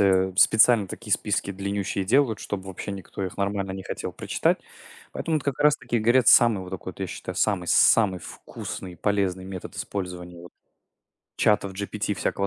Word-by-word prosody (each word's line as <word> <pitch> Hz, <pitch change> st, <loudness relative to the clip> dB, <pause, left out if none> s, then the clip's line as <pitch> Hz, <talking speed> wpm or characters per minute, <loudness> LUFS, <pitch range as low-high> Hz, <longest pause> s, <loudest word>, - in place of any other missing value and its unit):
э, 95 Hz, -1 st, +3 dB
специально 110 Hz, -1 st, +5 dB
такие 105 Hz, -3 st, -5 dB
списки 100 Hz, -1 st, 0 dB
длиннющие 100 Hz, 0 st, -2 dB
и 95 Hz, -, -7 dB
делают, 125 Hz, -1 st, +2 dB
чтоб 95 Hz, -2 st, -5 dB
вообще 95 Hz, +2 st, -6 dB
никто 95 Hz, 0 st, -6 dB
их 90 Hz, -, -6 dB
нормально 100 Hz, -1 st, -2 dB
не 95 Hz, 0 st, -6 dB
хотел -, -, -5 dB
прочитать. -, -, 0 dB, 0.5 s
Поэтому 160 Hz, -1 st, -1 dB
вот 150 Hz, -, -4 dB
как 140 Hz, 0 st, -2 dB
раз 150 Hz, 0 st, +5 dB
таки 120 Hz, -4 st, -2 dB
говорят, 120 Hz, +3 st, +3 dB
самый 115 Hz, -5 st, +6 dB
вот 90 Hz, -, -10 dB
так, 95 Hz, -1 st, -7 dB
я 95 Hz, -, -2 dB
считаю, 90 Hz, 0 st, -7 dB
самый 95 Hz, -4 st, 0 dB
самый 95 Hz, +2 st, +4 dB
вкусный 90 Hz, +1 st, -8 dB
и -, -, -14 dB
полезный 95 Hz, -2 st, 0 dB
метод 95 Hz, -1 st, -8 dB
использования, 90 Hz, -3 st, -5 dB
вот, 90 Hz, -, -13 dB, 0.8 s
чатов 100 Hz, -2 st, +2 dB
GPT 105 Hz, +1 st, -3 dB
и -, -, -2 dB
всякого 100 Hz, +3 st, -1 dB
100 Hz, 185 wpm, -25 LUFS, 95-110 Hz, 0.8 s, самый